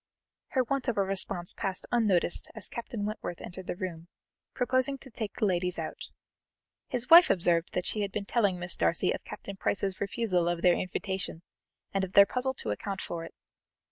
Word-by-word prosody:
Her 260 - +3
want 270 +2 -2
of 240 - 0
response 195 -2 -1
passed 190 -2 -1
unnoticed 205 -8 +3
as 220 - -2
Captain 230 -3 -5
Wentworth 210 -5 -5
entered 180 +1 -9
the - - -2
room, 175 -3 -6 0.5
proposing 260 +2 +1
to 265 -1 -14
take 220 -2 -5
the - - 0
ladies 180 -1 0
out. - - -6 0.8
His 250 +1 -3
wife 345 +2 +10
observed 175 -2 +2
that 180 - -1
she 215 - -1
had 200 -1 -2
been 200 0 -3
telling 200 -5 +1
Miss 175 0 0
Darcy 170 - +2
of - - -4
Captain 195 -1 -8
Price's 195 -1 -1
refusal 195 -4 0
of 175 0 -2
their 180 -1 +6
invitation, 185 -2 -3 0.5
and 195 -1 +1
of 190 0 -4
their 200 - +9
puzzle 260 +4 -1
to 110 - -4
account 195 - -4
for 165 -1 -5
it. - - -12
195 Hz, 185 wpm, -29 LUFS, 180-230 Hz, 0.8 s, wife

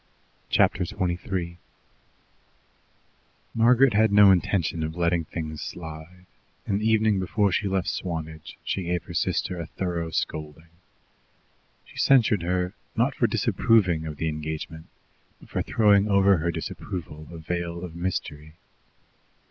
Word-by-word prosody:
Chapter 95 - +3
23 90 -1 -3 1.9
Margaret 125 +2 +5
had 110 0 +4
no 100 -1 +8
intention 90 -2 +1
of 80 +1 -3
letting 85 -1 +1
things 80 -3 -6
slide, 80 +3 -8 0.4
and 100 +1 -1
the 110 - +2
evening 110 -2 +3
before 100 +2 +1
she 100 +2 0
left 95 -2 -1
Swanage 80 -3 -5
she 95 - -2
gave 85 0 -1
her 85 - -10
sister 90 +2 -1
a 85 - -5
thorough 85 -2 -3
scolding. 80 0 -4 1.2
She - - -17
censured 120 -7 +4
her, 90 +1 -1 0.2
not - - +2
for - - +1
disapproving 90 -8 +2
of 75 -1 -6
the 80 - -2
engagement, 80 +1 -5 0.5
but - - -17
for - - -2
throwing 105 -2 +3
over 100 -1 +4
her 85 +2 -1
disapproval 80 -2 -6
a 85 - -8
veil 85 +1 -4
of 85 -2 -7
mystery. 80 -3 -4
85 Hz, 130 wpm, -25 LUFS, 80-100 Hz, 1.9 s, no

